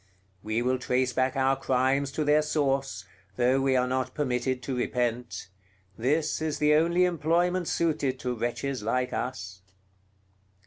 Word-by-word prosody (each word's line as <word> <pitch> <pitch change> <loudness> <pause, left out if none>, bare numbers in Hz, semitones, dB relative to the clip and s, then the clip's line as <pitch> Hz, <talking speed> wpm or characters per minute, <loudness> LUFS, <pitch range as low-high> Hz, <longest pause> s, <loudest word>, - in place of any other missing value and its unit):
We 110 +3 -1
will 130 +1 +1
trace 125 0 0
back 130 +2 +1
our 135 0 +2
crimes 135 +1 +1
to 155 - -1
their 150 +1 +4
source, 135 -9 -1 0.3
though 125 +4 +2
we 135 -1 +2
are 125 0 +3
not 130 0 -2
permitted 130 -2 -1
to 135 - -3
repent; 120 -4 -2 0.5
this 150 +7 0
is 155 -1 -1
the 150 0 +3
only 170 +4 +3
employment 175 +1 +1
suited 145 -5 0
to 125 -1 -1
wretches 120 +3 -3
like 125 +4 -1
us!" 95 -7 -4
130 Hz, 145 wpm, -27 LUFS, 125-150 Hz, 0.5 s, their